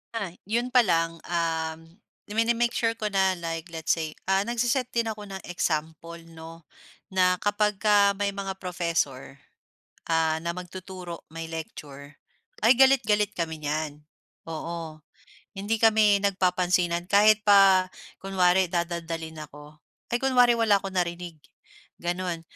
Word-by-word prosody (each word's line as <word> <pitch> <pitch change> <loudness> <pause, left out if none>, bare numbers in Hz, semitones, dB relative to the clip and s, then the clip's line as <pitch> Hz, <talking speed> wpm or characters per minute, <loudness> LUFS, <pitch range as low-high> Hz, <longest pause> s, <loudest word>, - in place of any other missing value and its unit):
Ay, 200 -7 -4
yun 235 +5 -1
pa 250 - +7
lang, 165 -3 0
um, 160 -2 -2 0.5
mini-make 235 +3 +1
sure 230 -1 +1
ko 215 - -1
na 195 -2 +2
like 165 0 -5
let's 160 -1 0
say, 160 -2 -4 0.2
ah, 195 +1 +2
nag-se-set 240 +3 -1
din 235 -1 0
ako 215 -1 -5
ng 195 -2 -7
example, 165 -1 -3
'no? 165 0 -12 0.4
Na 180 -1 +2
kapagka 205 -1 +2
may 200 -1 -1
mga 195 -1 -5
professor, 165 -7 -3 0.7
ah, 160 -1 +2
na 170 - -1
magtuturo 180 -1 -8
may 165 0 -6
lecture 145 -3 -8 0.5
ay 245 - +6
galit-galit 220 -6 +4
kami 160 -2 -3
niyan, 150 0 -3 0.5
oo. 160 -1 -6 0.6
Hindi 205 +3 -1
kami 215 -2 +5
nagpapansinan 180 -2 +1
kahit 215 +1 +5
pa 195 -2 +6 0.3
kunwari 185 -1 +2
dadaldalin 165 -2 -4
ako, 150 +1 -14 0.4
ay - - +2
kunwari 250 -2 +5
wala 225 -3 +3
akong 195 0 -6
narinig 175 -2 -3 0.6
gano'n. 175 -1 -3
180 Hz, 130 wpm, -26 LUFS, 165-205 Hz, 0.7 s, pa